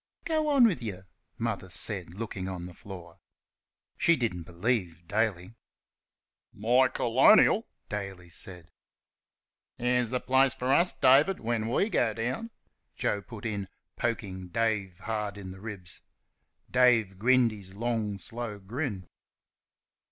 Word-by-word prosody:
"Go 315 -2 +1
on 275 -4 +6
with 185 - +2
you!" 100 -5 -5 0.3
Mother 110 -5 -3
said, 90 +1 -1
looking 100 -3 -4
on 90 -2 -5
the 90 - -9
floor. 85 -3 -11 0.8
She 170 - +5
didn't 110 - -2
believe 90 -3 -2
Daly. 105 -2 -1 1.0
"My 120 +5 +3
colonial!" 135 - +5 0.2
Daly 95 -4 -6
said. 85 0 -8 1.1
"That's 125 -1 +1
th' 125 +1 -2
place 130 0 +4
for 130 +2 0
us, 175 +5 +4
David, 145 +9 +4
when 115 -1 -1
we 165 - +2
go 120 - +1
down!" 125 - -3 0.5
Joe 100 - -1
put 105 +2 -10
in, 100 -3 -2 0.3
poking 95 -6 -3
Dave 105 -3 -1
hard 105 -2 -3
in 95 -2 -7
the 95 0 -11
ribs. 100 -6 -8 0.7
Dave 115 -7 +4
grinned 125 +1 +4
his 100 -3 -11
long 110 -2 -1
slow 115 +1 -6
grin. 100 - -4
110 Hz, 130 wpm, -29 LUFS, 95-125 Hz, 1.1 s, on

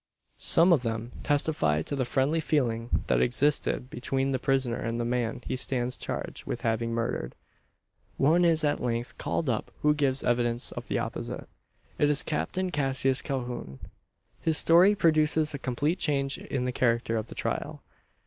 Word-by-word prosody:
Some 170 +2 +5
of 150 - +3
them 115 0 -3
testify 140 - +1
to 145 - -4
the 130 -2 0
friendly 135 +6 +1
feeling 120 -7 0
that - - +2
existed 130 0 +1
between 135 +2 -1
the 130 - 0
prisoner 135 -3 0
and 115 +1 -3
the 120 - -1
man 120 0 -2
he - - -2
stands 125 -1 -1
charged - - -5
with - - -3
having 115 0 -1
murdered. 115 - -2 0.8
One 160 +6 +4
is 165 -2 +3
at 145 - +1
length 120 0 -3
called 165 - -2
up 115 -4 -1
who 150 0 +5
gives 140 -2 0
evidence 120 0 +1
of - - -7
the - - -1
opposite. - - -4 0.5
It 145 - +4
is 150 0 +1
Captain 180 +4 -2
Cassius 135 -3 +1
Calhoun. 120 - -4 0.6
His 160 -2 +2
story 180 +5 +6
produces 155 -3 +3
a 140 - -4
complete 145 +8 -1
change 140 -3 0
in 130 -2 -3
the 125 - -1
character 120 -2 +1
of 110 0 -2
the - - -10
trial. - - -3
130 Hz, 170 wpm, -28 LUFS, 120-150 Hz, 0.8 s, story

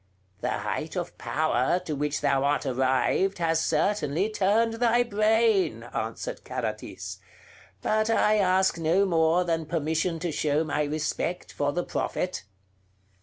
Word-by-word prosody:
"The - - -2
height - - -3
of - - -4
power 155 0 +1
to 155 - -3
which 145 +1 -2
thou 140 -2 +2
art 145 +1 +1
arrived 130 +9 +1
has 165 -1 +1
certainly 195 0 0
turned 215 +3 +2
thy 240 +1 +3
brain," 220 -1 +2
answered - - -4
Carathis; - - -5 0.6
"but 215 +1 +1
I 215 -1 +3
ask 185 -2 +2
no 170 +5 +3
more 165 -1 +3
than 165 -2 -1
permission 160 +1 -1
to 170 +1 -3
show 150 +1 +1
my 150 -1 -1
respect 155 +4 -3
for 145 0 0
the 175 +4 -1
Prophet. 180 - -3
170 Hz, 135 wpm, -27 LUFS, 150-200 Hz, 0.6 s, thy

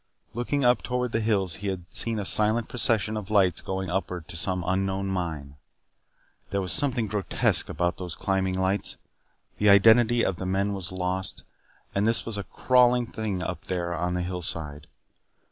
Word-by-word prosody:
Looking 125 +4 -1
up 120 -5 +4
toward 125 +3 -2
the 110 - 0
hills 100 -5 0
he 100 - -6
had 95 -3 -4
seen 115 -1 -1
a 105 - -3
silent 110 +3 +4
procession 110 -3 +2
of 105 -2 -5
lights 95 -5 +2
going 95 -1 -4
upward 90 -3 -3
to - - -5
some 90 +2 +1
unknown 95 +1 -1
mine. 80 -7 -4 0.9
There 100 - -1
was 95 -2 +1
something 130 -6 +3
grotesque 105 -2 0
about 85 +3 -2
those 90 -3 -5
climbing 95 -1 -1
lights; 95 +2 -1 0.6
the 105 - +4
identity 115 +4 +5
of 95 - -1
the 95 - -5
men 100 +2 0
was 95 -2 -5
lost, 95 0 -2 0.5
and 100 +2 +1
this 115 0 +1
was 115 - -4
a 100 - -5
crawling 125 +3 +3
thing 105 -5 -4
up 90 -3 -5
there 85 -2 -3
on 90 +1 -2
the 90 - -1
hillside. 80 -5 -4
95 Hz, 175 wpm, -26 LUFS, 90-110 Hz, 0.9 s, identity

